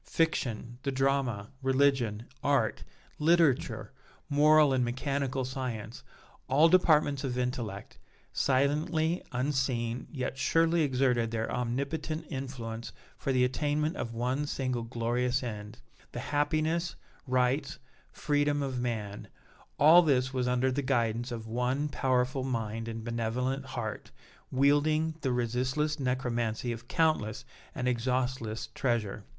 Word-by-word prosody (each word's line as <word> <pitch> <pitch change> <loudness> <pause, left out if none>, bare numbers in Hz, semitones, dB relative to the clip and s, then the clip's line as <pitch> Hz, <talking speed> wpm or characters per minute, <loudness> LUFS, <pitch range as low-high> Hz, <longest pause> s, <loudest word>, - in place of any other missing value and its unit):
Fiction, 120 -7 -1
the 140 - -1
drama, 135 -6 0
religion, 130 -5 +2 0.2
art, 135 -6 +1 0.4
literature, 160 -3 +2 0.4
moral 150 0 +6
and 130 -1 +2
mechanical 130 +1 -1
science 125 -4 -5 0.5
all 145 +5 +5
departments 155 -5 +4
of 125 -2 -2
intellect 120 -5 -4 0.3
silently, 155 +5 +1
unseen, 125 -2 -1
yet 130 -2 -4
surely 165 +2 +3
exerted 125 -5 +2
their 115 0 -2
omnipotent 140 +6 -2
influence 120 -4 -5 0.2
for 135 - -2
the 130 -1 +3
attainment 145 +4 0
of 115 - -4
one 130 +5 -1
single 130 -4 -2
glorious 120 +2 -1
end 105 -2 -6 0.4
the - - -4
happiness, 155 +3 0 0.3
rights, 130 +3 +1 0.3
freedom 145 -1 +1
of 130 -2 -2
man; 105 -4 -4 0.5
all 160 +4 +8
this 130 -5 +2
was 125 -1 0
under 125 +1 +2
the 140 +3 -1
guidance 120 -2 0
of 115 -2 -5
one 125 +5 -1
powerful 130 -1 0
mind 115 -3 -3
and 115 -1 -5
benevolent 120 +4 -2
heart, 120 -5 -5 0.4
wielding 145 +4 +3
the 135 - 0
resistless 130 +6 0
necromancy 120 -3 -1
of 115 +1 -7
countless 155 - +1 0.3
and 125 - -2
exhaustless 125 -2 -1
treasure! 110 -5 -1
130 Hz, 120 wpm, -30 LUFS, 120-145 Hz, 0.5 s, all